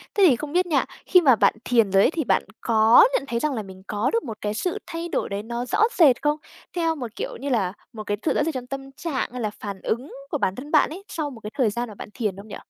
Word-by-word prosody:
thế 405 - +4
thì 260 - +4
không 290 +4 -6
biết 365 +1 +3
nha, 305 -6 +1 0.2
khi 365 - +6
mà 270 -7 +6
bạn - - +4
thiền 230 -5 +3
rồi 195 +1 +5
ấy - - +4
thì 325 -2 -1
bạn - - +2 0.2
có 225 - +6
nhận 290 - +1
thấy 235 -3 -1
rằng 300 +3 0
là 220 -4 -3
mình 190 -1 -12
có 210 +3 0
được 460 - +1
một 225 -6 -6
cái 210 0 -2
sự 345 +11 -2
thay 335 +1 -5
đổi - - -1
đấy 200 +1 -3
nó 235 +2 -4
rõ 250 - +2
rệt 280 -8 +6
không? 295 0 +1 0.4
Theo 330 -2 +1
một, 245 -7 -7
kiểu - - -4
như 280 +3 -4
là, 200 -8 +1 0.2
một 215 -2 -6
cái 205 0 -2
sự - - +3
rõ - - +1
rệt 320 +1 -1
trong 250 -2 -5
tâm 270 0 -6
trạng, 275 -2 -3
hay 250 0 -5
là 215 - 0
phản 200 -2 -6
ứng 245 +5 -3 0.2
của - - 0
bản 190 -8 0
thân 285 +4 -8
bạn 305 - +4
ấy 355 +6 -8
sau 310 -3 -3
một 250 -5 -11
cái 210 - -6
thời 250 -6 +3
gian 235 +3 -3
mà 210 - -10
bạn - - -9
thiền 210 -6 -2
không 200 +2 -10
nhỉ? 210 - -7
250 Hz, 300 wpm, -24 LUFS, 215-300 Hz, 0.4 s, khi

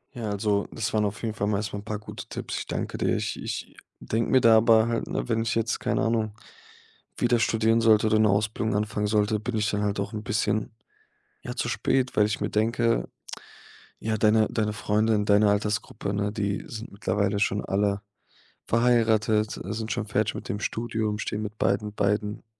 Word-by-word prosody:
Ja, 115 -3 -4
also, 100 0 0
das 110 -1 -3
waren 105 -1 +2
auf 105 +3 -4
jeden 110 - -1
Fall 100 -1 -2
mal 105 - +1
erst 100 -1 -4
mal 100 - -3
'n - - -10
paar 105 -1 -3
gute 105 - -9
Tipps. - - -5
Ich - - -6
danke - - -4
dir. - - +1
Ich - - -3
ich - - -5 0.2
denke 115 +1 -1
mir 130 - +5
da 115 -1 +7
aber 110 0 +5
halt, 115 -1 -1
ne, - - -3
wenn 115 - +1
ich 115 - -1
jetzt, 115 +1 0
keine - - 0
Ahnung, 110 -2 0 0.8
wieder 120 -1 +2
studieren 115 0 +2
sollte 110 -1 +5
oder 110 0 +3
'ne 110 - +5
Ausbildung 105 +1 0
anfangen 105 0 -1
sollte, 105 0 +1
bin 110 +1 -3
ich 105 0 +1
dann 105 0 -1
halt 100 -1 -1
auch 100 - -3
'n 105 -1 -4
bisschen, 105 0 0 0.7
ja, - - -5
zu - - -2
spät, 130 -1 0
weil 105 - +5
ich 105 - -3
mir 105 - -1
denke: 115 - +1 0.9
„Ja, 110 0 -2
deine 110 +1 +4
deine 105 -2 0
Freunde 110 +2 +1
in 105 0 0
deiner 105 0 +4
Altersgruppe, 105 0 -1
ne, 100 0 -1
die 100 -2 -2
sind 115 +1 -8
mittlerweile 100 0 0
schon 105 0 0
alle 100 +1 0 0.7
verheiratet, 110 -2 +2
äh, 95 - -4
sind 110 0 -4
schon 110 - -2
fertig 105 0 0
mit - - -7
dem 105 +2 -3
Studium, 110 -2 -2
stehen 105 0 -3
mit 105 0 -6
beiden 100 +2 0
beiden 105 +1 -1
105 Hz, 205 wpm, -26 LUFS, 105-110 Hz, 0.9 s, da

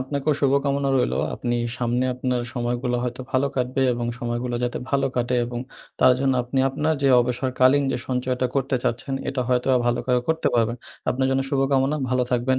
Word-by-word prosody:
আপনাকেও 140 +3 -1
শুভকামনা 140 0 +1
রইলো। 125 - +1 0.2
আপনি 120 -1 -2 0.2
সামনে 120 +1 0
আপনার 125 0 -1
সময়গুলো 120 0 -1
হয়তো 125 +1 -4
ভালো 130 +2 +2
কাটবে 130 +1 0
এবং 120 0 -3
সময়গুলো 120 +1 -2
যাতে 120 - -2
ভালো 140 -1 +2
কাটে 125 0 0
এবং 120 0 -5 0.4
তার 130 - +7
জন্য 135 -1 +2
আপনি 125 +2 -2
আপনার 155 +4 0
যে 140 - +4
অবসরকালীন 130 +3 +2
যে - - 0
সঞ্চয়টা 125 0 0
করতে 135 -1 +1
চাচ্ছেন 125 +3 -1
এটা 135 -1 -2
হয়তো 125 -1 +1
আ - - +5
ভালো 120 0 +1
করো 125 -1 +2
করতে 160 0 +1
পারবেন। 115 0 +1 0.3
আপনার 130 +1 0
জন্য 135 0 +1
শুভকামনা। 135 +1 +2
ভালো 130 0 +2
থাকবেন। 130 +1 +1
130 Hz, 180 wpm, -23 LUFS, 125-135 Hz, 0.4 s, তার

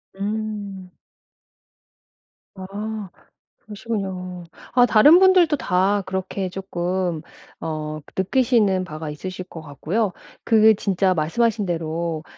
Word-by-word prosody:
음. 205 -2 -4 1.7
아. 205 +1 -6 0.6
그러시군요. 190 -5 -5 0.3
아 245 0 +6
다른 245 +10 +7
분들도 370 -5 +5
다 195 -2 +1
그렇게 190 0 -3
조끔 180 -3 -2 0.4
어 155 -1 -4 0.2
느끼시는 210 -3 +2
바가 155 -3 -6
있으실 185 +4 -6
것 165 -3 -10
같고요. 175 +8 -2 0.3
그게 220 -1 +6
진짜 195 -2 +1
말씀하신 205 +7 0
대로 165 -1 -3
190 Hz, 210 characters per minute, -22 LUFS, 175-215 Hz, 1.7 s, 다른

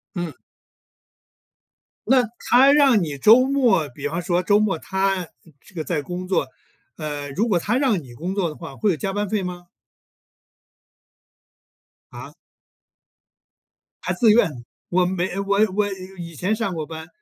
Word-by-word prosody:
嗯。 175 -4 -3 1.7
那 255 +1 +4 0.3
他 265 +3 +7
让 275 -7 +5
你 150 -3 -4
周 225 - +6
末 255 - +2
比 140 +3 -5
方 165 +4 -3
说 175 +1 0
周 205 +3 +3
末 210 -5 +1
他 190 -1 -1 0.3
这 - - -20
个 160 - -3
在 155 -2 -2
工 180 +4 -6
作 180 -7 0 0.5
呃， 145 -2 -5
如 205 +12 0
果 190 -6 +2
他 215 +8 0
让 255 -10 +1
你 125 -3 -13
工 175 +10 -5
作 195 -4 0
的 150 - -9
话， 165 -5 -9
会 210 +8 +1
有 - - 0
加 175 +6 -3
班 205 +1 -2
费 210 +1 -1
吗？ 180 -1 -7 2.4
啊？ - - -10 1.7
还 - - -1
自 230 -3 +4
愿， 210 -5 +4 0.4
我 180 +1 +2
没 185 0 -1
我 200 0 0 0.2
我 205 +1 +1 0.3
以 170 -2 -8
前 185 +8 0
上 220 -4 -2
过 160 -2 -4
班， 160 0 -8
185 Hz, 165 characters per minute, -22 LUFS, 165-210 Hz, 2.4 s, 他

